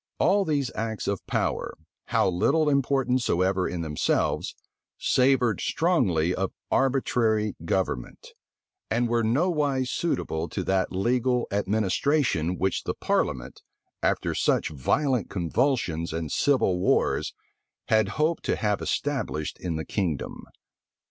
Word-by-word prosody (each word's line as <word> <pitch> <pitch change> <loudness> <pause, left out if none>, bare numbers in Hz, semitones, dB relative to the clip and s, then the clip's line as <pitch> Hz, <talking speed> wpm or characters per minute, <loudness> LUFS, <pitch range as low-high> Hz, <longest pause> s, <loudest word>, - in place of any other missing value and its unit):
All 195 +2 +3
these 140 -6 0
acts 110 -1 -3
of 100 -2 -2
power, - - -1 0.3
how - - +2
little 140 - +2
important 135 -2 +1
soever 95 -2 +1
in 85 -1 -3
themselves, 75 -2 0 0.4
savored 125 -4 +2
strongly 90 - +1
of 95 0 -2 0.2
arbitrary 115 -6 +1
government; 85 -9 -2 0.6
and 120 +2 +1
were 120 0 +1
nowise 140 0 +1
suitable 85 - -2
to - - -3
that 95 -1 0
legal 125 +5 +1
administration 100 - +1
which 95 -1 0
the - - -2
parliament, - - -1 0.4
after - - 0
such - - +1
violent 120 - 0
convulsions 90 - 0
and 80 -3 -3
civil 130 -10 +2
wars, - - +1 0.5
had 110 -2 +4
hoped 155 +2 +1
to - - +1
have 105 -2 -1
established 135 - -2
in 85 -3 -3
the 80 - -4
kingdom. 85 -9 -3
110 Hz, 120 wpm, -26 LUFS, 90-135 Hz, 0.6 s, had